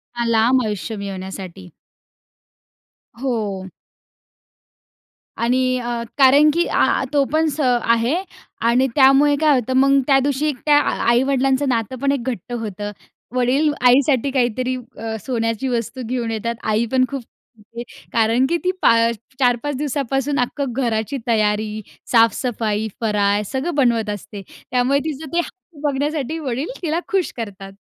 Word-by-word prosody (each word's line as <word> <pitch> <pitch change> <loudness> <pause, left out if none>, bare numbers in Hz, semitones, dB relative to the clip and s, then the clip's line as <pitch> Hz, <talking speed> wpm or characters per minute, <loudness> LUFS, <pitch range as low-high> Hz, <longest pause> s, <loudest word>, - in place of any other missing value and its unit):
हां, 240 0 -1
लांब 235 +3 +3
आयुष्य 210 0 -4
मिळवण्यासाठी. 190 -2 -7 1.5
हो. 210 -7 -3 1.7
आणि 255 +2 +1
अ, 240 -1 -3 0.2
कारण, 280 +3 +6
की 340 +2 +1
आ - - +2
तो 285 -1 +4
पण 320 0 +3
स 295 +2 -6
आहे. 240 +1 +2 0.5
आणि 240 +3 +3
त्यामुळे 280 +1 +5
काय 305 -2 +5
होतं 255 +2 -3
मग 275 +1 +5
त्यादिवशी 280 +2 +2
त्या 295 -1 +5
आ - - 0 0.2
आई-वडिलांचं 265 +2 +2
नातं 230 +1 -1
पण 280 0 +2
एक 280 - 0
घट्ट 240 +1 -6
होतं. 210 -3 -4 0.4
वडील 265 +5 +2 0.2
आईसाठी 265 +1 +3
काहीतरी 255 0 0 0.2
अ, 225 0 -4
सोन्याची 230 0 -1
वस्तू 245 +1 -3
घेऊन 240 -2 -2
येतात. 230 +2 -3
आई 220 +2 +1
पण 255 -1 +3
खूप 275 -2 -4
खुश 225 -1 -28
होते. 235 - -3 0.3
कारण 230 +3 +3
की, 340 - +2
ती 365 +2 -1
पा 230 - +5 0.4
4-5 255 +3 +1
दिवसापासून 280 0 -1
अख्खं 250 +1 -2
घराची 235 +1 -1
तयारी, 215 -1 0 0.3
साफ-सफाई, 225 -2 +2
फराळ 205 -2 +1
सगळं 280 +5 -2
बनवत 235 -6 +2
असते. 205 0 -6 0.3
त्यामुळे 255 +3 +2
तिचं 310 0 -5
ते 345 - +2
हसू 345 -3 -8
बघण्यासाठी 290 +2 -2
वडील 270 0 -3
तिला 330 0 -1
खुश 385 -3 +1
करतात. 195 -3 -7
250 Hz, 140 wpm, -20 LUFS, 225-275 Hz, 1.7 s, कारण